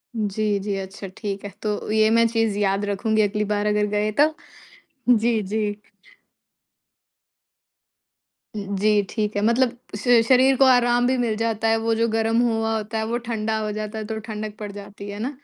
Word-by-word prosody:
जी, 210 -1 -1
जी, 200 0 -3
अच्छा 195 +1 -7
ठीक 200 -1 -4
है, - - -4
तो 210 0 -3
ये 215 0 +4
मैं 230 +1 +4
चीज़ 225 -3 0
याद 200 0 +1
रखूँगी 215 +2 0
अगली 210 0 0
बार 205 0 -1
अगर 210 0 +2
गए 210 +1 0
तो। 305 +2 +5 0.8
जी, 225 0 +1
जी। 210 +1 -2 2.8
अ, - - -4
जी, 205 +1 +1
ठीक 210 -2 -2
है, 205 - 0
मतलब 240 +1 +2 0.2
श 235 +2 +4
शरीर 260 +1 +5
को 270 - +5
आराम 245 -1 +4
भी 260 0 +1
मिल 235 -3 0
जाता 225 0 -1
है, 225 0 +3
वो 225 0 0
जो 230 +1 +1
गर्म 225 +1 +2
हुआ 225 -2 0
होता 220 +1 -4
है, 220 - -1
वो 235 +2 -1
ठंडा 220 -1 -1
हो 215 - -2
जाता 215 +1 -5
है 215 - -4
तो 220 0 -4
ठंडक 215 0 -5
पड़ 210 -1 -6
जाती 200 0 -9
है 205 +1 -6
ना। 245 - -2
215 Hz, 185 wpm, -23 LUFS, 205-230 Hz, 2.8 s, तो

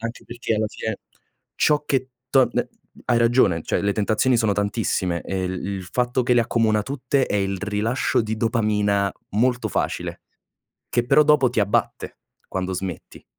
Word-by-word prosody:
anche 115 +1 -6
perché 120 -1 -3
alla 110 - 0
fine 110 -1 -5 0.6
ciò 150 -1 +2
che 130 -1 0 0.2
torn 130 -3 +4
ehm, - - -1 0.4
hai 120 - +3
ragione, 115 -8 +3
cioè - - -1
le 100 0 0
tentazioni 110 +4 +2
sono 110 -3 +2
tantissime 100 -4 -1
e 95 -1 -3
il 90 0 -4
il 100 -1 -4
fatto 125 +6 0
che 125 0 +2
le 120 - +4
accomuna 110 -2 +1
tutte 135 +2 0
è - - -1
il 95 -1 -1
rilascio 105 +6 0
di 110 0 -3
dopamina 105 -3 +1 0.2
molto 125 +4 +1
facile, - - -3 0.7
che 120 0 +1
però 150 - +6
dopo 150 -3 +4
ti 120 - -3
abbatte, 100 0 -1 0.3
quando 95 0 -3
smetti. 90 -2 -6
110 Hz, 165 wpm, -23 LUFS, 100-125 Hz, 0.7 s, però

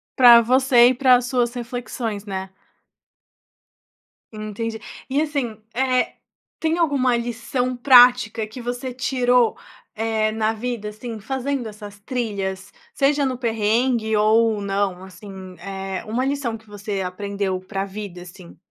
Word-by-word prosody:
Pra 240 -2 +9
você 250 0 +5
e - - +2
para 255 0 +5
as 245 0 0
suas 245 -2 0
reflexões, 235 -3 -4
né. 190 -1 -5 1.9
Entendi 220 +1 -5 0.3
e 280 +3 +1
assim, 275 -8 -2 0.2
eh, 255 0 +1 0.5
tem 320 +1 0
alguma 275 -7 +2
lição 245 +2 -2
prática 245 -4 +5
que 240 +3 -9
você 245 +2 -4
tirou, 250 -1 +2 0.4
eh, 220 -1 0
na 220 0 0
vida 225 -2 -4
assim, 220 +1 -7
fazendo 265 +1 -3
essas 205 -1 -11
trilhas? 200 -5 -4 0.2
Seja 280 +1 +2
no 255 -2 -3
perrengue 225 0 +1
ou 220 0 +3
não, 195 -2 -2
assim, 190 0 -11
eh, 195 -1 -5
uma 235 +4 -1
lição 270 -5 -2
que 220 - -22
você 205 -1 -4
aprendeu 190 0 -3
para 195 +1 -4
vida 195 -3 -8
assim? 180 -1 -14
225 Hz, 130 wpm, -22 LUFS, 205-250 Hz, 1.9 s, Pra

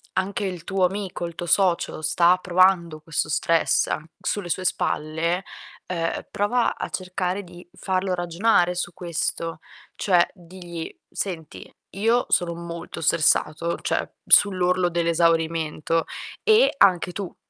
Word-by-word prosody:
anche 195 +2 -1
il 180 -3 -5
tuo 190 0 +1
amico, 190 -2 -3
il 170 - -6
tuo 175 +2 -6
socio 175 -3 +2
sta 175 +3 +4
provando 180 -3 +2
questo 160 -1 -2
stress 165 +2 +2
an 155 - -3 0.2
sulle 205 -4 -2
sue 185 - -1
spalle, 165 +4 -1 0.4
uhm, 165 -2 -3
prova 230 +4 0
a - - -3
cercare 185 +1 -3
di 175 0 -14
farlo 185 0 -1
ragionare 175 +1 +2
su 175 -1 -3
questo. 165 -1 -3 0.4
Cioè, 180 -3 +3
digli: 175 -2 -9
"Senti, 165 -6 -5 0.3
io 230 +4 +2
sono 175 -1 +2
molto 170 0 -7
stressato, 165 +1 +2
cioè, - - -1 0.2
sull'orlo 185 -2 +4
dell'esaurimento, 165 -1 +1 0.4
e 450 +3 +5
anche 180 -4 +4
tu, 190 0 -6
175 Hz, 125 wpm, -24 LUFS, 165-185 Hz, 0.4 s, e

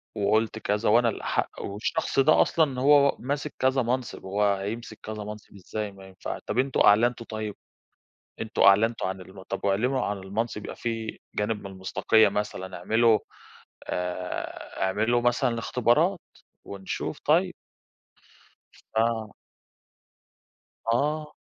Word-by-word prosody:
وقُلت 110 +2 +1
كذا، 105 +1 0
وأنا 115 +1 +5
الأحق، - - -2
والشخص 105 +6 -2
ده 155 +3 +6
أصلًا 140 -6 +2
هو 140 0 +5
ماسك 145 +3 -3
كذا 130 0 +3
منصب، 125 +1 -2
هو 100 +1 +2
هيمسك 110 +3 -6
كذا 110 -1 -5
منصب 105 0 -9
إزاي؟ 105 +2 -5
ما 95 -1 -13
ينفعش 95 - -6
طَب 120 - -1
أنتم 135 0 +1
أعلنتم 115 +3 +4
طيب، 110 -2 -5 0.9
أنتم 110 +1 -1
أعلنتم 105 +2 +5
عن 95 0 -5
الم 95 +1 -12
طَب 100 - -4
اعلنوا 125 +7 +1
عن 100 -1 -2
المنصب 105 +3 -3
يبقى - - -7
في 115 -1 -4 0.2
جانب 105 0 -1
من - - -9
المصداقية 95 +3 +3
مثلًا، 100 -2 -4
اعملوا 110 +4 +4 0.7
آآ 90 +1 -4
اعملوا 110 +5 +2
مثلًا 120 +2 +2
الاختبارات، 120 +1 +2 0.4
ونشوف 95 -1 -5
طيّب." - - +3 1.4
آه. 110 -1 +1 1.6
آه. 150 +4 -1
110 Hz, 125 wpm, -26 LUFS, 100-120 Hz, 1.6 s, ده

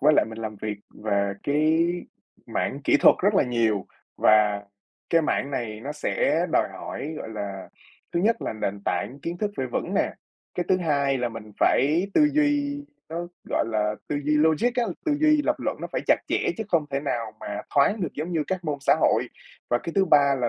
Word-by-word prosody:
với 150 +3 +5
lại - - +5
mình 110 - -8
làm 110 -2 -5
việc 105 +1 -4 0.3
về 100 -2 +1
cái 155 +3 +3 0.6
mảng - - -2
kỹ - - +5
thuật - - +8
rất - - +3
là - - +5
nhiều, 115 -5 0 0.3
và 105 -1 +4 0.5
cái 165 -1 +4
mảng 140 -2 0
này 110 -5 -4
nó 140 +4 -5
sẽ - - +1
đòi - - +3
hỏi, 155 +2 -6
gọi - - -6
là, 100 -3 -6 0.4
thứ 170 - +1
nhất 225 +4 +2
là - - -2
nền 100 -2 -3
tảng 90 +10 -2
kiến 170 +1 -3
thức 210 +1 -1
phải 130 - -1
vững 120 - -3
nè, - - +1 0.4
cái 180 - -1
thứ 185 - +4
hai 140 -5 +1
là 120 - 0
mình 110 -2 -9
phải 155 +8 +3
tư 300 -1 +6
duy, 290 -1 +1 0.2
nó, 170 +2 -4 0.2
gọi - - +1
là, 105 -1 0
tư 145 - -1
duy 150 +1 +2
logic 160 +10 +3
á, 245 - +2 0.2
tư 310 - +2
duy 305 -1 +4
lập - - +1
luận - - -2
nó - - -3
phải - - -1
chặt - - +6
chẽ, 440 - +1
chứ 220 - -3
không 165 -6 +2
thể 140 0 -1
nào 120 -6 -2
mà 105 0 -4
thoáng 145 +10 +3
được 175 -6 -2
giống 160 +4 -4
như 160 -3 +1
các 185 -2 -3
môn 150 -2 -1
xã 140 - +4
hội. - - +3 0.4
Và 120 - +3
cái 165 - -6
thứ 195 - +4
ba 145 -5 +5
là 125 -3 0
145 Hz, 215 wpm, -25 LUFS, 110-175 Hz, 0.6 s, thuật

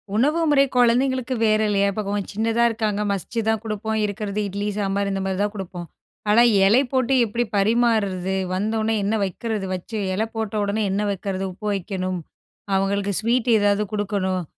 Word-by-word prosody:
உணவு 295 +9 +2
முறை 280 -2 +5
கொழந்தைங்களுக்கு 255 +1 +2
வேற 215 -1 +3
இல்லயா? 200 -1 +2
இப்ப 215 - -3
கொஞ் 205 -1 -1
சின்னதா 225 +3 +1
இருக்காங்க 215 -2 -1
மசிச்சுதான் 220 +2 -1
குடுப்போம். 220 0 -2
இருக்கிறது 205 0 -3
இட்லி 200 +1 -3
சாம்பார் 200 0 0
இந்த 195 0 -2
மாதிரி 190 0 -2
தான் 205 0 -2
குடுப்போம். 180 -3 -6 0.4
ஆனா, 215 +3 +6 0.2
எலை 220 +7 +5
போட்டு 260 0 +1
எப்படி 235 +2 -1
பரிமார்றது? 200 -3 +1 0.2
வந்தவொன்னே 220 +3 0
என்ன 205 +3 0
வைக்கிறது? 205 +2 -3
வச்சு 185 +5 -5 0.2
இலை 215 +4 0
போட்டவொடனே 215 -1 -1
என்ன 200 +2 0
வைக்கிறது? 195 0 -3
உப்பு 210 +4 -7
வைக்கணும். 185 -1 -3 0.6
அவங்களுக்கு 200 +1 0
ஸ்வீட் 235 +2 +1
ஏதாவது 205 0 +2
குடுக்கணும். 195 -3 -1
210 Hz, 150 wpm, -22 LUFS, 195-225 Hz, 0.6 s, ஆனா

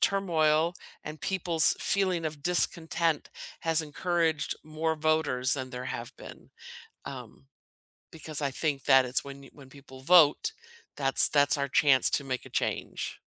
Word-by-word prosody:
turmoil 165 -4 +1 0.3
and 155 0 -8
people's 170 -4 +2
feeling 185 -4 0
of 150 -2 -5
discontent 165 -2 -1 0.3
has 165 -1 +1
encouraged 160 0 -1
more 155 +1 -2
voters 155 -5 0
than 130 -2 -5
there 125 0 -7
have - - -7
been, - - -13 0.6
um, 70 +1 -10 0.7
because 155 -2 -7
I 140 - 0
think 140 0 -3
that 135 -1 +5
it's 125 +2 -1
when 140 0 -10
you - - -15
when 140 -3 -15
people 130 -1 -14
vote, 155 -1 +4 0.4
that's 135 -1 +5
that's 145 0 +3
our 140 0 -2
chance 135 -2 +3
to 140 - -1
make 130 -2 -4
a - - -13
change. - - -4
150 Hz, 150 wpm, -28 LUFS, 135-165 Hz, 0.7 s, that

